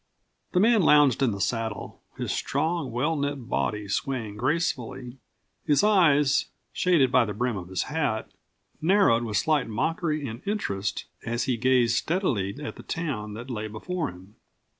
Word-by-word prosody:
The 180 - +3
man 225 +1 +5
lounged 145 -5 +5
in 135 - +4
the 100 - -5
saddle, 110 +1 -3 0.2
his - - -2
strong, 160 -3 -1
well 140 +8 0
knit 140 -4 -3
body 105 -4 -1
swaying 110 0 -2
gracefully, 130 -2 -2 0.4
his 145 +5 +3
eyes, 155 -9 +4 0.3
shaded 160 -8 +3
by 130 - +5
the 105 -2 -3
brim 120 +1 -1
of 90 -3 -6
his 95 0 -2
hat, 145 -8 -2 0.5
narrowed 180 - +4
with 110 -3 -1
slight 150 +5 +2
mockery 155 - -1
and 115 +2 -7
interest 100 - -2 0.2
as 120 +1 -1
he 130 - 0
gazed 120 -1 +3
steadily 130 - 0
at - - -6
the - - -9
town 120 -11 -4
that 120 +4 -7
lay 110 -2 -3
before 150 - -3
him. 95 +3 -14
130 Hz, 160 wpm, -26 LUFS, 110-160 Hz, 0.5 s, man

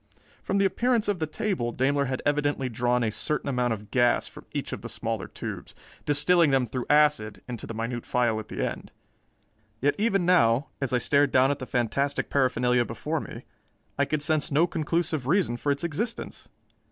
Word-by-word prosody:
From 195 - -1
the 200 - +3
appearance 235 +4 +1
of 205 -4 0
the 160 - -1
table, 155 - -2
Daimler 140 +3 +1
had 130 0 -3
evidently 145 -2 0
drawn 120 +1 +1
a 110 - 0
certain 150 +6 -2
amount 125 -3 0
of 105 -2 -5
gas 120 -1 +2
from - - -13
each - - -4
of - - -5
the - - -7
smaller - - -3
tubes, - - -7 0.3
distilling 155 +3 +4
them 135 -2 +2
through 125 +2 -5
acid 145 -8 +3
into 120 -3 -6
the - - -5
minute 115 +1 -3
phial 120 -3 +1
at 110 - -8
the - - -2
end. - - -7 0.9
Yet 145 +4 +2
even 195 -4 +2
now, 135 -7 +3
as 135 - -1
I 125 - +3
stared 140 +3 +2
down 130 +2 +4
at 145 - -3
the 130 - -6
fantastic 140 +4 -1
paraphernalia 125 -2 +2
before 115 - -3
me, - - -8 0.5
I - - +2
could 155 -1 -1
sense 155 -1 0
no 150 +4 +4
conclusive 160 -4 -1
reason 170 -6 +2
for 145 +4 -1
its 140 +2 -2
existence. 210 +9 -4
140 Hz, 190 wpm, -26 LUFS, 120-155 Hz, 0.9 s, distilling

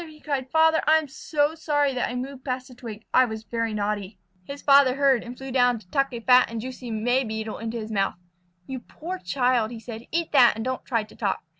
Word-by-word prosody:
he 305 -1 -14
cried. 275 -4 -3
"Father, 320 +1 +4
I 315 +1 +7
am 315 -2 -2
so 295 +2 0
sorry 290 -3 0
that 250 - -1
I 245 - -5
moved 260 +1 -6
past 255 -1 -3
the - - -12
twig. 225 -3 -9
I 255 - +6
was 220 -2 -6
very 230 0 -2
naughty." 205 -1 -3 0.3
His 280 +5 -8
father 275 -2 +6
heard 275 -3 +3
and 245 +1 -9
flew 265 0 -7
down 245 -2 +3
to 210 -4 -15
tuck 275 +3 +1
a 240 - -5
fat 250 +2 +5
and 230 0 -4
juicy 250 +1 -7
May 245 +4 +1
Beetle 220 -1 -5
into 230 +1 -4
his 220 -1 -6
mouth. 195 -2 0 0.5
"You 260 +4 -5
poor 355 +9 -7
child!" 245 -6 0
said 225 0 -8
he. - - -21
"Eat 335 0 -1
that 255 -5 +6
and 225 - -5
don't 260 0 -3
try 230 -4 0
to 215 - -16
talk. 200 -4 -2
250 Hz, 240 wpm, -25 LUFS, 225-275 Hz, 0.5 s, I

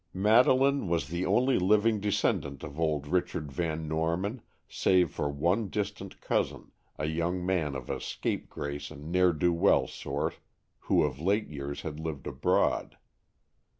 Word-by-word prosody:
Madeleine 130 +5 +4
was 85 -3 0
the 85 +3 -2
only 130 +1 +3
living 105 +3 +3
descendant 75 -8 -1
of 75 - -7
old 75 -3 0
Richard 85 -2 -1
Van 80 +1 -2
Norman, 85 +9 -1 0.3
save 90 -4 +2
for 75 - -2
one 85 +10 +1
distant 100 +1 -4
cousin, - - -2 0.3
a 75 - -2
young 85 +3 -1
man 85 -7 0
of 65 -2 -6
a - - -3
scapegrace 70 0 -4
and 75 +1 -9
ne'er 90 0 +4
do 85 +2 +1
weel 90 +4 +4
sort, - - -4 0.4
who - - +2
of 70 -3 -2
late 100 +6 +1
years 70 -1 -5
had 75 -1 -5
lived 80 -4 -5
abroad. - - 0
85 Hz, 150 wpm, -29 LUFS, 75-100 Hz, 0.4 s, Madeleine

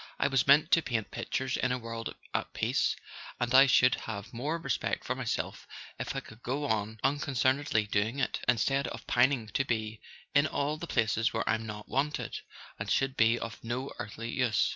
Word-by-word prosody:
I - - +2
was 135 -2 +2
meant 150 +3 +6
to 165 - +6
paint 115 -7 -2
pictures 130 -1 -2
in 130 - +1
a 125 - +1
world 115 -1 -6 0.2
at - - -2
peace, - - +1 0.4
and 120 0 0
I 135 +1 +9
should 125 -1 +5 0.2
have 100 0 -6
more 145 +8 -2
respect 140 -7 -2
for - - 0
myself - - -3 0.3
if - - -3
I - - -1
could 110 +2 -14
go 140 +4 -2
on 110 -3 -1
unconcernedly 135 -4 +1
doing 105 +5 0
it, 140 - 0
instead 135 +3 +2
of - - -7
pining 120 -2 +2
to 135 - +1
be 110 -3 -2 0.3
in 145 +2 +5
all 145 +1 -1
the 170 - -6
places 115 -2 +1
where - - -1
I'm 110 0 0
not 105 0 -7
wanted, 145 +3 -1 0.4
and - - -4
should 135 -1 +1
be 115 0 +4
of 115 -4 -7
no 125 +4 -3
earthly 115 +3 -5
use. 125 -3 +2
125 Hz, 190 wpm, -30 LUFS, 110-135 Hz, 0.4 s, I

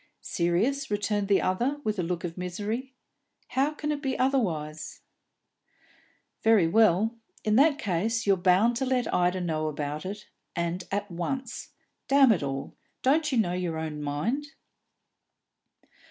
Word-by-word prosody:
"Serious?" 210 +12 0
returned 205 -1 0
the 200 -1 +3
other, 245 +10 0
with 215 -4 -1
a - - +3
look 175 0 -3
of 170 -2 -4
misery. 210 +9 -4 0.5
"How 270 +3 +2
can 300 0 -3
it 290 -1 -2
be 265 -2 -1
otherwise?" 165 - -1 1.4
"Very 220 -6 +5
well; 215 +3 +4 0.3
in 215 0 +2
that 285 +1 +5
case 225 - -1
you're 200 -1 +5
bound 190 +6 +3
to 265 - 0
let 255 -2 0
Ida 180 +1 +2
know 155 -3 -1
about 150 0 -3
it, 200 +2 -6 0.3
and 170 +1 -2
at 205 0 -2
once. 235 +9 -4 0.3
Damn 270 -2 +6
it 200 - +2
all, 135 -1 -4 0.3
don't 305 +3 +3
you 255 - +1
know 185 -6 +2
your 180 -3 -2
own 155 -2 -4
mind?" 215 - -2
205 Hz, 145 wpm, -27 LUFS, 170-255 Hz, 1.4 s, Damn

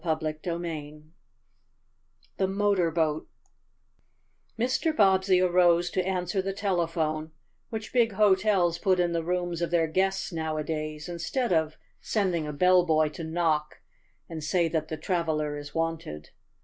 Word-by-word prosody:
CHAPTER 155 -2 -1
XI 160 -4 -5 1.3
THE 190 - +1
MOTOR 195 -3 +1
BOAT 160 -1 -1 1.3
Mr. 255 +7 0
Bobbsey 190 -2 +4
arose 175 -1 +3
to 185 - 0
answer 185 +1 -1
the 195 +1 -3
telephone, 165 -5 -1 0.4
which 220 -1 -6
big 235 -4 +3
hotels 190 -4 +3
put 185 0 +2
in 175 -1 +2
the 165 -1 -1
rooms 175 0 -2
of 170 - 0
their 170 -1 +2
guests 190 +3 -1
nowadays 155 -1 -3
instead 180 +7 -2
of 160 -1 0 0.2
sending 180 -7 -1
a - - -3
bellboy 165 -1 +3
to 160 +2 -8
knock 160 -2 -1 0.5
and 160 -2 -7
say 170 +2 +1
that 155 -1 -1
the 155 - -5
traveler 155 -3 -1
is 145 +1 -9
wanted. 165 - -3
170 Hz, 135 wpm, -27 LUFS, 155-190 Hz, 1.3 s, Bobbsey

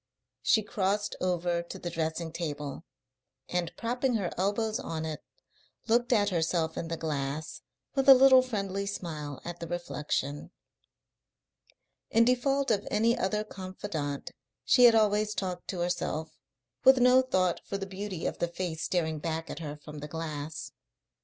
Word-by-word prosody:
She 220 - +3
crossed 205 +1 -1
over 175 -1 0
to 170 - -8
the 175 - -5
dressing 160 0 -2
table, 150 -3 -4 0.6
and, 175 -2 -1
propping 245 +2 0
her 195 -5 -1
elbows 215 +4 0
on 160 -11 -4
it, 155 -1 -4 0.7
looked 240 +2 +2
at 205 -4 +4
herself 165 -2 0
in 165 - -3
the 165 0 -3
glass, 150 -1 -3 0.3
with 270 -1 +2
a 270 - +12
little 260 0 +8
friendly 200 -5 -3
smile 155 -7 -5
at 175 0 -6
the 170 - -5
reflection. 150 -4 -3 1.6
In 230 +1 +5
default 270 +2 +2
of 205 -2 0
any 230 +3 +3
other 210 -2 0
confidant 185 -8 -5 0.3
she 250 - +6
had 235 -1 +8
always 210 -1 +2
talked 180 -2 -3
to 180 -3 -3
herself, 175 -3 -2 0.5
with 265 0 +8
no 250 +1 +6
thought 185 -9 +1
for 200 - -4
the 195 - -4
beauty 195 -2 -5
of - - -2
the 175 - +1
face 170 -2 -4
staring 160 -4 0
back 165 +1 -3
at - - -6
her 150 -2 -6
from 150 0 -10
the 150 - -6
glass. 155 -1 -5
180 Hz, 155 wpm, -29 LUFS, 160-215 Hz, 1.6 s, a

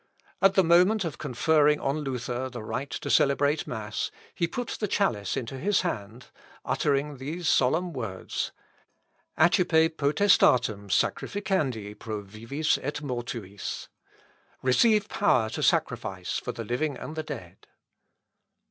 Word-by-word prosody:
At 195 0 +5
the 190 - +5
moment 180 +4 +4
of 150 -7 -5
conferring 150 +3 +3
on 140 +3 -1
Luther 130 -2 -3
the 120 -3 -7
right 135 +5 -4
to - - -5
celebrate 145 +2 +3
mass, 110 -2 -3 0.2
he 170 - 0
put 245 +7 -4
the 210 - 0
chalice 115 - 0
into 130 +2 -4
his 200 +7 +2
hand, 120 - -5 0.3
uttering 145 0 0
these 155 +6 -4
solemn 160 +8 +2
words, 115 -8 -4 0.9
"Accipe 160 -1 +4
potestatem 125 - +3
sacrificandi 130 - -1
pro 110 -2 -5
vivis 115 +10 -1
et 150 +2 -4
mortuis" 120 -7 -5 0.7
"Receive 210 - +4
power 125 - +2
to - - -4
sacrifice - - 0
for - - -4
the 115 - -6
living 135 +6 -1
and 155 - -7
the 160 - -2
dead." 90 - -9
140 Hz, 130 wpm, -27 LUFS, 115-165 Hz, 0.9 s, At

